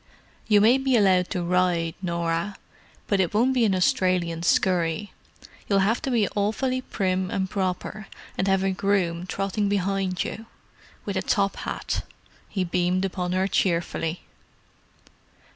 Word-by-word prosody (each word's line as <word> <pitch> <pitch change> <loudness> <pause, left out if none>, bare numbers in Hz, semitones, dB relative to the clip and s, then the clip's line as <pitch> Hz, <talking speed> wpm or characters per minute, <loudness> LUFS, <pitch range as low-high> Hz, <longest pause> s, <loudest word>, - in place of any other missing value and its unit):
You 210 -2 +5
may 240 +5 +5
be 265 -2 +2
allowed 185 -3 +3
to 180 - -2
ride, 175 -2 +1
Norah, 170 +2 -2 0.5
but 200 - +1
it 185 +1 0
won't 250 +5 +3
be 245 -3 +3
an 195 -3 +2
Australian 180 -2 +1
scurry—you'll 180 +3 -1
have 200 +4 +2
to - - -2
be 230 -5 +2
awfully 235 +6 -1
prim 185 -5 -1
and 190 0 -1
proper, 190 +2 -3 0.3
and 190 - -1
have 195 0 +2
a 195 - +1
groom 185 -3 0
trotting 200 +2 -1
behind 195 -2 0
you. 225 0 -7 0.6
With - - -2
a - - +1
top - - +1
hat." - - -3 0.5
He 190 - -1
beamed 180 +2 0
upon 180 -1 -2
her 190 +1 +1
cheerfully. 170 -3 0
190 Hz, 145 wpm, -25 LUFS, 180-205 Hz, 0.6 s, You